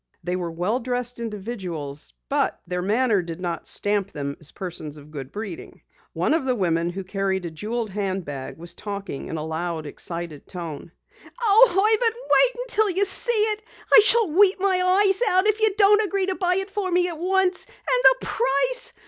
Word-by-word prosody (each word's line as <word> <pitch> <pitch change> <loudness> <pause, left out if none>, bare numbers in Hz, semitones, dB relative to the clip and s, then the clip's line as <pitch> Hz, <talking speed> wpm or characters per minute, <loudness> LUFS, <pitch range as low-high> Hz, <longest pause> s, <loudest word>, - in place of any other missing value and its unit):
They 180 +2 -3
were 175 -2 -4
well 180 +9 -2
dressed 245 -1 -3
individuals 190 - -7 0.2
but - - -1
their 180 0 -4
manner 215 +1 +1
did 170 -1 -8
not 175 -2 -5
stamp 205 -1 -1
them 140 -1 -5
as 155 - -5
persons 160 -5 -8
of 150 +1 -15
good 135 -4 -8
breeding. 205 -5 -9 0.3
One - - 0
of 325 - 0
the 255 -1 -1
women 170 -4 -1
who 190 +2 -6
carried 190 -1 -3
a 170 - -6
jeweled 215 +6 -5
handbag 185 -9 -5
was 170 +1 -8
talking 200 -8 -7
in 160 - -5
a 155 - -5
loud, 160 0 -4
excited 170 0 -6
tone: 170 -3 -8 0.5
"Oh, 455 +1 +6
Herbert, 435 +4 +3
wait - - +5
until 435 -4 +1
you 385 +2 +2
see 395 +5 +4 0.2
it! 425 - -9 0.3
I - - +10
shall 435 -3 +4
weep 385 +3 +4
my 370 0 +3
eyes 390 +2 +3
out 370 +1 +4
if 430 0 +2
you 435 - +6
don't 415 +1 +5
agree 395 -2 0
to 380 0 -2
buy 360 -1 +1
it 385 +1 -2
for 395 -2 -3
me 355 0 +2
at 335 -3 -3
once. 370 +1 +1
And - - -22 0.5
the - - -7
price! - - 0
220 Hz, 190 wpm, -22 LUFS, -, 0.5 s, I